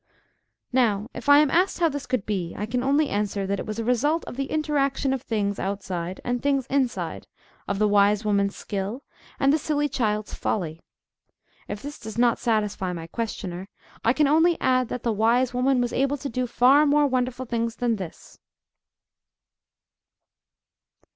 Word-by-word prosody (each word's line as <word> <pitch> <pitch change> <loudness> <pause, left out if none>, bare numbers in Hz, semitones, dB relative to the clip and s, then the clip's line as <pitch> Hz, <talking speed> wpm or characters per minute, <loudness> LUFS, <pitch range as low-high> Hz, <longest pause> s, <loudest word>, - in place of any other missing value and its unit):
Now, 225 -2 +1
if 245 - -5
I 285 - +9
am 295 -2 +4
asked 365 +3 +2
how 340 - +4
this 285 -3 -4
could 250 -6 -1
be, 185 -5 -3
I 210 - -2
can 245 +3 -2
only 285 +3 +2
answer, 205 -1 -1
that 200 0 -1
it - - -6
was 215 0 -4
a 230 - -2
result 275 +8 +1
of - - -8
the 275 +1 -2
interaction 280 -3 0
of 265 - -2
things 205 -4 -2
outside 185 -2 -4
and 245 0 -1
things 275 -2 +1
inside, 265 -3 -1 0.4
of 200 - -1
the 215 +1 +3
wise 205 +1 +3
woman's 200 -1 +1
skill, 205 +6 -4 0.4
and 275 +1 +4
the 315 - +2
silly 295 0 0
child's 215 -6 -1
folly. 165 -5 -3 0.9
If 205 0 -6
this 290 +1 -7
does 220 -1 -8
not 240 -1 +3
satisfy 210 -5 0
my 165 -2 -6
questioner, 190 -2 -5 0.3
I 230 - +4
can 300 +1 +3
only 325 +4 +3
add, 255 -1 +2
that 250 - -5
the 230 - +1
wise 235 +4 +2
woman 255 +1 +2
was 245 -1 -1
able 275 +2 +1
to 280 0 -5
do 250 +2 -2
far 270 +5 +5
more 295 +1 +4
wonderful 255 -1 -1
things 230 -1 -2
than 235 -2 0
this. 185 -5 -9
240 Hz, 175 wpm, -25 LUFS, 205-275 Hz, 0.9 s, I